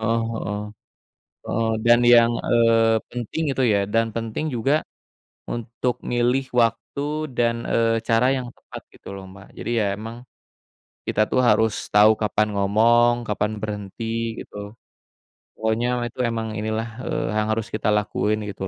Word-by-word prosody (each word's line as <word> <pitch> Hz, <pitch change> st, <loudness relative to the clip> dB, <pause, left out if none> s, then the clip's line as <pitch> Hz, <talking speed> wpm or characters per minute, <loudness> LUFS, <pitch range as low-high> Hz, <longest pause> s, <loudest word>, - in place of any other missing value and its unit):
Eee 115 Hz, +1 st, +1 dB, 0.2 s
heeh, 105 Hz, +1 st, -3 dB, 0.9 s
eee, 115 Hz, 0 st, 0 dB, 0.2 s
dan 120 Hz, 0 st, +7 dB
yang, 120 Hz, -1 st, +6 dB
eee, 115 Hz, -1 st, +3 dB
penting 125 Hz, +6 st, -4 dB
itu 135 Hz, -, +1 dB
ya, 105 Hz, -4 st, +3 dB
dan 115 Hz, +2 st, +1 dB
penting 115 Hz, +5 st, -3 dB
juga 135 Hz, +5 st, +1 dB, 0.6 s
untuk 120 Hz, +1 st, -3 dB
milih 125 Hz, +2 st, 0 dB
waktu 140 Hz, +6 st, 0 dB
dan, 115 Hz, -1 st, 0 dB
eee, 115 Hz, -1 st, +1 dB
cara 115 Hz, +4 st, +3 dB
yang 130 Hz, -2 st, -4 dB
tepat -, -, -12 dB
gitu -, -, -11 dB
loh, 95 Hz, -, -8 dB
Mbak, 95 Hz, 0 st, -15 dB
jadi -, -, -4 dB
ya 105 Hz, -, +1 dB
emang, 115 Hz, +3 st, -8 dB, 0.9 s
kita 110 Hz, +1 st, +2 dB
tuh 130 Hz, -, +1 dB
harus 110 Hz, -2 st, +3 dB, 0.2 s
tahu 105 Hz, +1 st, +6 dB
kapan 105 Hz, -1 st, 0 dB
ngomong, 115 Hz, +4 st, +3 dB
kapan 105 Hz, +1 st, -1 dB
berhenti, 110 Hz, +2 st, -4 dB
gitu. 105 Hz, +1 st, -10 dB, 0.8 s
Pokoknya 110 Hz, +2 st, 0 dB, 0.2 s
itu 125 Hz, -, -19 dB
emang 115 Hz, -1 st, -2 dB
inilah, 110 Hz, +1 st, -2 dB, 0.2 s
eee, 155 Hz, -2 st, -2 dB
yang 105 Hz, 0 st, +1 dB
harus 110 Hz, -1 st, -3 dB
kita 110 Hz, -, -2 dB
lakuin, 105 Hz, +1 st, 0 dB
gitu 95 Hz, -1 st, -5 dB
115 Hz, 145 wpm, -23 LUFS, 110-120 Hz, 0.9 s, dan